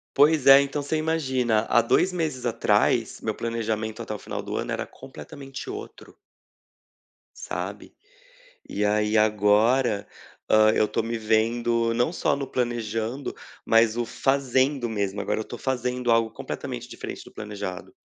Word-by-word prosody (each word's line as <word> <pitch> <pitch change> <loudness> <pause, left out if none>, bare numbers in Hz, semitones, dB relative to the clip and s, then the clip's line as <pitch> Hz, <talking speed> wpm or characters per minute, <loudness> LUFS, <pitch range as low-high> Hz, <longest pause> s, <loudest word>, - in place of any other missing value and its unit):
Pois 150 0 +4
é, 135 0 +10
então 140 +1 -2
você 155 +2 -1
imagina, 130 -8 +1
há 120 - +5
2 180 +10 +2
meses 155 -8 -3
atrás, 115 - +1
meu - - -2
planejamento 110 -1 -3
até 110 -2 -5
o 105 - -6
final - - -5
do - - -4
ano - - -2
era - - -3
completamente 135 - -10
outro 415 +3 -9 1.3
sabe. - - -6 0.8
E 105 - -1
aí 105 +1 +2
agora, 105 +2 +3 0.4
hã, 110 0 +6
eu 110 - +3
tô - - -1
me 115 +1 -3
vendo, 115 +1 +1
não 120 +8 +1
só 165 - 0
no 140 -1 -4
planejando, 120 0 -2 0.3
mas 115 0 +4
o 120 - 0
fazendo 135 0 +1
mesmo, 100 -2 -2
agora 105 - -1
eu 110 - -4
tô - - -8
fazendo 125 -1 -1
algo 115 -1 +3
completamente - - -6
diferente - - -7
do - - -15
planejado. 100 -3 -6
115 Hz, 150 wpm, -25 LUFS, 110-135 Hz, 1.3 s, é